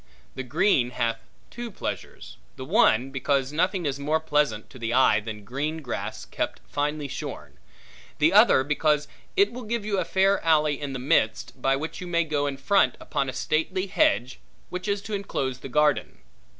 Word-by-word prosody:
The 130 - -5
green 140 -1 +2
hath 115 -2 -2 0.3
two 240 -1 -6
pleasures: 200 - -6 0.2
the - - -7
one, 125 +5 +3
because 135 +1 0
nothing 180 +2 0
is 140 -1 -2
more 150 +3 +1
pleasant 150 -9 0
to 130 - -12
the 115 +1 -1
eye 130 -5 +5
than 105 0 -7
green 150 +7 -3
grass 120 - -5
kept - - -3
finely 145 0 -2
shorn; 135 - -7 0.6
the - - +3
other, 130 - +6
because 150 +1 +1 0.3
it 400 +1 +4
will 250 - -6
give 225 -1 -3
you 200 -2 0
a - - +1
fair 195 +2 +2
alley 150 -3 +2
in 140 -2 -4
the - - -3
midst, 125 -1 0
by 135 +1 +3
which 155 +6 -5
you 180 - -6
may 170 -1 +2
go 145 -2 -1
in 140 -1 -3
front 195 +9 +2
upon 140 -3 -2
a - - -5
stately 185 +5 -1
hedge, 130 -9 +1 0.3
which 180 +3 -5
is 200 0 -1
to 215 - -6
enclose 135 -10 -2
the 135 - -8
garden. 150 +2 +1
150 Hz, 185 wpm, -26 LUFS, 130-175 Hz, 0.6 s, other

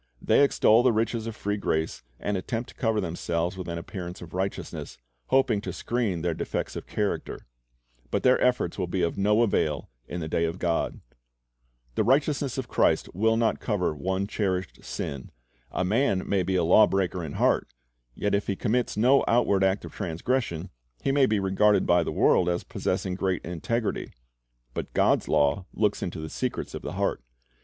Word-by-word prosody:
They - - +4
extol 115 -4 +5
the 125 - +4
riches 115 0 -1
of 115 - -5
free 105 -1 -2
grace, 80 -5 -1 0.2
and 105 - -1
attempt 115 +6 -3
to - - -14
cover 110 -3 +1
themselves 85 -1 -2
witii 95 -2 -6
an - - -4
appearance 90 0 -6
of 85 -2 -11
righteousness, 95 -8 -4 0.3
hoping 125 -6 +3
to 95 - -4
screen 100 -2 -2
their 85 -1 +1
defects - - -3
of - - -6
character; 105 -1 -3 0.6
but - - -1
their 130 0 +4
efforts 125 -8 +1
will - - -1
be 90 +1 -1
of 85 - 0
no 105 +3 +3
avail 75 - 0 0.2
in 90 - -4
the 80 - -4
day 85 +1 +1
of 85 +2 -3
God. 85 -2 -1 0.9
The - - +1
righteousness 140 0 +1
of 130 -2 -3
Christ - - +1
will 110 +4 +2
not 115 -1 +1
cover 95 -8 0
one 95 +5 -1
cherished 95 -4 -2
sin. 70 -3 -5 0.4
A 90 - -1
man 100 -1 +1
may 100 -2 +2
be 95 +1 -1
a 90 - +3
law 100 +6 +6
breaker 95 -2 -1
in 75 -3 -5
heart; - - +2 0.5
yet 105 - -1
if 100 0 +1
he 100 - 0
commits 120 +3 0
no 130 +5 +5
outward 110 -5 +3
act 95 +1 +1
of - - -9
transgression, 95 0 -2 0.3
he 135 - +2
may 135 -1 +4
be 105 -1 +1
regarded 95 +1 +3
by 90 0 +4
the - - -2
world 90 - +3
as 85 0 -1
possessing 95 - -2
great 95 -1 -1
integrity. 105 +7 -2 0.6
But - - -5
God's - - +3
law 75 +6 +2
looks 105 -2 0
into 85 - -4
the 80 - -5
secrets - - -3
of - - -5
the - - -5
heart. - - -1
95 Hz, 185 wpm, -27 LUFS, 85-115 Hz, 0.9 s, law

